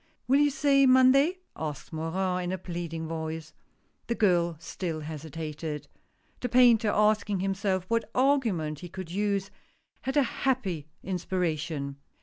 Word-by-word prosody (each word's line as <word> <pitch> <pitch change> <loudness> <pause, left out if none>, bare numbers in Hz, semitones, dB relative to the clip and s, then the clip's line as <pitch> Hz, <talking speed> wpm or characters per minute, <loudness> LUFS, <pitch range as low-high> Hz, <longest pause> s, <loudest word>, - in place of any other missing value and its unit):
" - - -46
Will 270 +3 +5
you 290 0 +5
say 275 -1 +4
Monday? 270 +8 +5
" - - -50
asked 150 0 -6
Morin, 180 +3 -1
in 175 - -2
a 185 - -1
pleading 170 -2 -5
voice. 160 0 -5 0.5
The 235 - 0
girl 175 -6 +2
still 165 0 -4
hesitated. 155 0 -5 0.5
The 245 - -2
painter 235 -3 +5
asking 210 -2 +2
himself 195 -1 0
what 230 0 0
argument 225 - +1
he 175 - -8
could 185 -1 -7
use, 200 0 -1 0.5
had 265 +3 -2
a 285 - +6
happy 215 - -1 0.2
inspiration. 165 -6 -2
185 Hz, 140 wpm, -28 LUFS, 160-230 Hz, 0.5 s, a